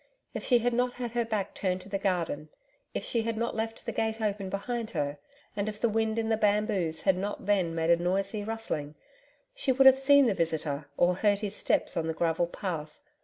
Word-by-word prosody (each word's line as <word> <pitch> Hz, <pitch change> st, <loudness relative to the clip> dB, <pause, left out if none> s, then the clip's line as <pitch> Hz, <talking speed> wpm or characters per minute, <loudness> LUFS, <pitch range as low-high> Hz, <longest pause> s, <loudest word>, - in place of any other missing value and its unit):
If -, -, -5 dB
she 245 Hz, -, +4 dB
had 240 Hz, +1 st, 0 dB
not 245 Hz, +1 st, +1 dB
had 245 Hz, -2 st, -4 dB
her 240 Hz, 0 st, +1 dB
back 215 Hz, -4 st, -2 dB
turned 185 Hz, -1 st, -1 dB
to 195 Hz, -, -13 dB
the 195 Hz, 0 st, -2 dB
garden; 170 Hz, -6 st, -1 dB, 0.4 s
if -, -, -4 dB
she 230 Hz, -, +1 dB
had 225 Hz, 0 st, -2 dB
not 235 Hz, +1 st, -1 dB
left 225 Hz, 0 st, -4 dB
the -, -, -2 dB
gate 220 Hz, 0 st, -1 dB
open 205 Hz, -3 st, -2 dB
behind 225 Hz, +3 st, -3 dB
her, 145 Hz, 0 st, -1 dB, 0.4 s
and 205 Hz, +1 st, -1 dB
if 210 Hz, 0 st, -7 dB
the 235 Hz, -, +2 dB
wind 220 Hz, 0 st, 0 dB
in 225 Hz, -1 st, 0 dB
the 220 Hz, 0 st, +2 dB
bamboos 205 Hz, -6 st, +1 dB
had 190 Hz, -2 st, +3 dB
not 200 Hz, +1 st, -4 dB
then 190 Hz, -5 st, +1 dB
made 165 Hz, 0 st, +2 dB
a 170 Hz, -, +6 dB
noisy 195 Hz, +4 st, -1 dB
rustling, 205 Hz, -10 st, -4 dB, 0.6 s
she 270 Hz, -, 0 dB
would 265 Hz, +1 st, +4 dB
have 265 Hz, 0 st, +8 dB
seen 280 Hz, +1 st, +6 dB
the 225 Hz, -, +3 dB
visitor 160 Hz, -4 st, -2 dB
or 175 Hz, +1 st, +4 dB
heard 205 Hz, 0 st, +2 dB
his 205 Hz, -1 st, -3 dB
steps -, -, 0 dB
on 160 Hz, -, -1 dB
the 160 Hz, -, -2 dB
gravel 170 Hz, +1 st, +1 dB
path. 165 Hz, -4 st, -5 dB
205 Hz, 220 wpm, -29 LUFS, 175-225 Hz, 0.6 s, have